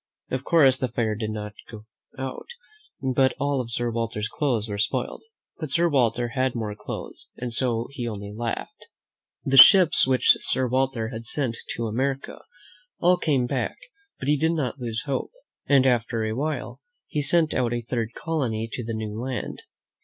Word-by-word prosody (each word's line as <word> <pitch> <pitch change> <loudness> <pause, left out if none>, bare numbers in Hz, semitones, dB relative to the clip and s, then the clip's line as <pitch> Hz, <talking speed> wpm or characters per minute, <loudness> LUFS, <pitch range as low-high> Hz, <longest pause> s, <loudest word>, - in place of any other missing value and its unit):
Of 130 0 -2
course 135 -6 +5
the 130 - 0
fire 115 -2 -1
did 110 0 -4
not 105 -1 -5 0.2
go 110 -1 -10 0.3
out, 130 -1 -6 0.6
but 130 0 +2
all 140 -1 0
of 120 - -7
Sir 120 0 -1
Walter's 115 -2 -2
clothes 120 -8 -1
were 100 -1 -4
spoiled; 125 +3 -1 0.4
but 155 -5 -5
Sir 170 +3 +3
Walter 120 -4 +1
had 130 0 -1
more 110 -3 -3
clothes, 105 0 -7
and 120 -1 -4
so 120 -1 +1
he 125 -4 -4
only 105 -2 -6
laughed. 115 +1 -5 0.6
The 135 0 +2
ships 180 - +8
which 130 -1 +5
Sir 130 -1 +4
Walter 130 -3 0
had 115 -1 -7
sent 130 -5 -1 0.2
to 115 - -3
America 130 +5 -2 0.6
all 180 +1 +4
came 140 -8 +1
back, - - -2 0.4
but 130 - -6
he 150 +1 +3
did 160 +3 +1
not 145 -4 -2
lose 115 -3 -2
hope, 140 -2 -2 0.4
and 135 -2 +5
after 120 -2 +1
a 110 0 -1
while 150 +6 -3 0.2
he 150 -3 -2
sent 160 +2 +2
out 125 -2 0
a 120 0 -1
third 115 -1 -3
colony 125 -9 -2
to 120 - -4
the 115 0 -4
new 110 -1 -4
land. 130 0 -4
125 Hz, 175 wpm, -25 LUFS, 115-135 Hz, 0.6 s, ships